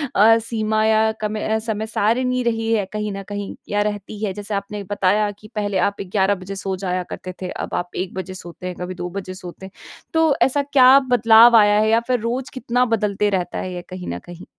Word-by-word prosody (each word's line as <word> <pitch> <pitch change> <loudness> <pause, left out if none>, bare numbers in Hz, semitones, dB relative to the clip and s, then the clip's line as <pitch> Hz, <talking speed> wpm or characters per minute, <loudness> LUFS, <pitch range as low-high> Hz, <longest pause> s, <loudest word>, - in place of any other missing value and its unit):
अ, 225 +3 +6
सीमा 220 -1 -1
या 220 0 +3
कमे 215 0 -2
अ, 220 0 +1
समय 220 -1 -3
सारणी 250 +4 0
रही 225 -1 -1
है 205 -3 +1
कहीं 210 0 -2
न 195 - -6
कहीं, 205 -1 -5
या 205 0 +1
रहती 205 0 -4
है? 195 - -2
जैसे 205 +1 -6
आपने 200 +1 -4
बताया 205 +2 +1
कि 215 - -13
पहले 205 -2 -1
आप 200 - -10
ए - - -2
11 195 +1 +1
बजे 185 +1 -8
सो 195 0 -3
जाया 180 -1 -2
करते 185 - -7
थे, 185 - -4
अब - - -5
आप 175 0 -3
1 185 0 -3
बजे 190 0 -5
सोते 180 0 -9
हैं, 180 - -5
कभी 180 +1 -5
2 175 0 -5
बजे 185 0 -6
सोते 185 0 -10
हैं। 190 - -11 0.4
तो 320 -3 +3
ऐसा 285 +2 +3
क्या 270 -2 +6
बदलाव 230 0 +7
आया 205 0 +5
है, 215 - +2
या 225 +1 +4
फिर 250 -1 +1
रोज़ 240 +4 -3
कितना 250 -1 0
बदलते 210 -3 0
रहता 180 -3 -2
है 185 -1 -4
ये 175 - -5
कहीं 185 -1 -7
न 90 - -5
कहीं? 175 0 -11
210 Hz, 230 wpm, -21 LUFS, 190-225 Hz, 0.4 s, बदलाव